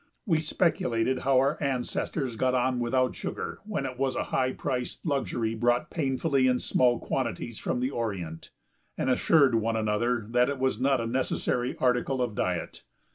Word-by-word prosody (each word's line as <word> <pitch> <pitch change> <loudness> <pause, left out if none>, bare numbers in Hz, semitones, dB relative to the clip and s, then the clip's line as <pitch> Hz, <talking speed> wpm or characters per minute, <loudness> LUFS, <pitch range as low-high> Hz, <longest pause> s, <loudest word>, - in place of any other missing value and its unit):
We 165 -7 +2
speculated 130 -6 +1
how 135 0 +2
our 135 +4 +2
ancestors 130 -1 -2
got 130 +2 +1
on 125 0 +1
without 125 +2 +1
sugar - - -5
when 200 -10 -2
it 130 -1 -6
was 135 -1 0
a - - 0
high 130 0 +2
priced 125 +3 -4
luxury 130 -6 -1
brought 120 +2 +1
painfully 135 -2 +1
in 125 -1 +3
small 125 -1 +2
quantities 115 0 -3
from 125 - -2
the 130 +2 0
Orient, 95 - -4 0.5
and 130 - +1
assured 140 0 +4
one 115 0 +1
another 110 +2 0
that 125 +2 +3
it 140 - -2
was 130 -3 0
not 135 -2 +3
a - - -2
necessary 125 0 -1
article 125 +1 +1
of 120 -3 -1
diet. 90 -3 -2
125 Hz, 170 wpm, -28 LUFS, 120-135 Hz, 0.5 s, assured